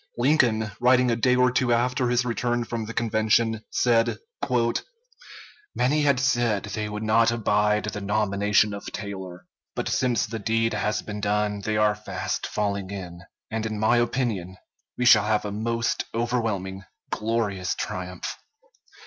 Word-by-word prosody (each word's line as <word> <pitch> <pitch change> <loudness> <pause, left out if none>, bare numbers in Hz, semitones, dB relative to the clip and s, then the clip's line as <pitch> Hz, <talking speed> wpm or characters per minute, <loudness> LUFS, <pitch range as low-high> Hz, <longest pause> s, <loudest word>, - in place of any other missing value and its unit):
Lincoln, 120 -5 +2
writing 125 0 +4
a - - +2
day 125 +2 +3
or 125 0 +4
two 125 -1 +1
after 125 +1 +1
his 125 0 +2
return 120 0 -1
from 115 -1 -4
the 110 - -6
convention, 110 0 +1
said: 115 -1 +2 1.6
"Many 145 +5 +2
had 140 -3 +3
said 120 -6 +1
they 105 0 -4
would 105 +1 -5
not 115 +1 +4
abide 105 -2 +1
the 105 -1 -4
nomination 105 0 +2
of 100 - -7
Taylor; 95 -2 -7 0.3
but - - -2
since 125 -4 +1
the 115 0 -5
deed 115 +2 0
has 105 - -1
been 105 -1 -6
done 105 0 0
they 110 +1 -1
are 105 0 +4
fast 105 0 -4
falling 100 -2 -2
in, 90 -3 -7 0.3
and 110 0 -2
in 110 -1 -4
my 110 +3 +3
opinion 115 -7 -1 0.4
we 125 - 0
shall 110 -4 +7
have 105 -1 +1
a 105 - -3
most 115 +2 -1
overwhelming, 110 -6 -1 0.3
glorious 105 -4 -1
triumph. 90 -3 -5
110 Hz, 150 wpm, -25 LUFS, 105-120 Hz, 1.6 s, shall